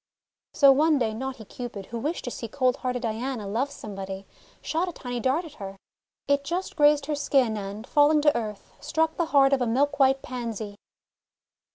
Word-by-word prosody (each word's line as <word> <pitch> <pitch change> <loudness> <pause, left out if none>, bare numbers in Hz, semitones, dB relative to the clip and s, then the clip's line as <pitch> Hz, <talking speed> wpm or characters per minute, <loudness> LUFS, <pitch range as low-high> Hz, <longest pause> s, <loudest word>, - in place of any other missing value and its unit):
So 275 -2 +7
one 305 +3 +4
day 225 -4 0
naughty 255 -1 -5
Cupid, 225 -2 -7
who 235 +3 -6
wished 305 +8 -2
to 245 - -4
see 230 - -5
cold 255 +2 +1
hearted 250 -1 -3
Diana 230 0 -3
love 235 +8 -1
somebody, 195 -6 -7 0.3
shot 340 +3 -1
a - - -5
tiny 245 -6 -5
dart 265 +9 +1
at 310 - -11
her. 195 0 -6 0.5
It 280 0 +2
just 350 +6 -3
grazed 295 -2 +4
her 300 - -2
skin, 270 -5 +2
and 205 +2 -6
falling 295 +2 +4
to 295 0 +4
earth, 215 -3 -5
struck 320 +2 0
the 340 - +1
heart 280 -3 +4
of 270 - +2
a 245 - +1
milk 285 +5 +1
white 270 0 +4
Pansy. 230 -4 -5
260 Hz, 190 wpm, -26 LUFS, 225-290 Hz, 0.5 s, So